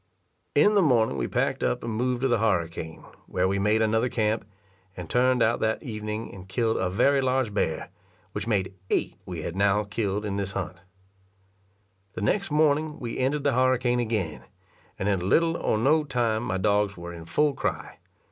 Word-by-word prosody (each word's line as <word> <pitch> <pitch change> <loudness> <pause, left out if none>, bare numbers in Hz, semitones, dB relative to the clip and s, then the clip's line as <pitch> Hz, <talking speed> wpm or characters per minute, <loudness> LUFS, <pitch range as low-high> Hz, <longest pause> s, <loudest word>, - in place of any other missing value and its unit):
In 205 +9 +5
the 205 - +5
morning 120 - +3
we 65 - -1
packed - - 0
up 125 - 0
and 115 - -3
moved 125 +2 -1
to 135 - +2
the 120 -3 +2
harricane, 85 -6 -1 0.2
where 90 +1 +1
we 100 +1 0
made 105 +2 +3
another 110 +3 +2
camp, 110 -2 0 0.5
and 90 -2 -6
turned 125 +4 +3
out 115 +1 +2
that 110 +6 0
evening 105 -3 -5
and 95 -1 -11
killed 110 +3 0
a - - 0
very 135 +8 +3
large 130 -4 0
bear, 80 -6 -1 0.4
which 105 - -4
made 100 -4 0 0.2
eight - - 0
we 85 -4 -5
had 85 - -4
now 100 +1 +3
killed 105 0 -2
in 100 -1 -2
this 100 -1 -3
hunt. 90 - -4 1.4
The - - -5
next 195 - +1
morning 150 0 +2
we 120 -2 -5
entered 140 +3 0
the 140 -1 +2
harricane 125 -1 +2
again, 110 -9 -2 0.5
and 95 - -2
in 95 -2 0
little 165 +7 +3
or 110 - 0
no 150 +8 +3
time 120 -5 0
my 95 - -1
dogs 100 0 +1
were 85 0 -7
in 85 -1 -9
full 150 - +2
cry. - - -4
110 Hz, 185 wpm, -26 LUFS, 100-130 Hz, 1.4 s, In